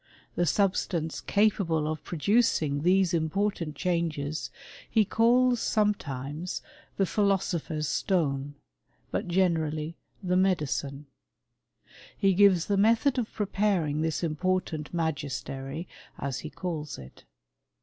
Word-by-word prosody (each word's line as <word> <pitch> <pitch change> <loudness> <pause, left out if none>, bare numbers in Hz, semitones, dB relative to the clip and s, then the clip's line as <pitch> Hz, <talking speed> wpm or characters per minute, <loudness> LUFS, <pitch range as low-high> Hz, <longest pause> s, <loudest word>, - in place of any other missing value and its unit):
The 175 - +1
subtance 175 -2 0
capable 190 -7 +2
of 155 0 -3
producing^ 165 -5 +1
these 185 +1 +3
important 165 0 -1
changes 160 -3 -1 0.4
he 220 -2 +3
calls 245 +3 +3
sometimes 160 - -1 0.3
thepAifo 200 0 +2
sopher's 155 -4 -3
stone, 145 -5 0 0.6
but - - -2
generally 165 -3 0 0.3
the 180 -1 0
Tnedi<nne. 150 -6 0 1.1
He 195 -1 +3
gives 185 -3 +5
the 200 - +1
method 230 +6 +3
of 230 - -3
preparing 195 -7 0
this 160 0 -1
important 165 -1 -1
magiitery, 140 -2 -3 0.3
as 140 -2 -3
he 155 - -6
calls 160 -4 -5
it. 65 -1 -13
170 Hz, 105 wpm, -28 LUFS, 150-195 Hz, 1.1 s, gives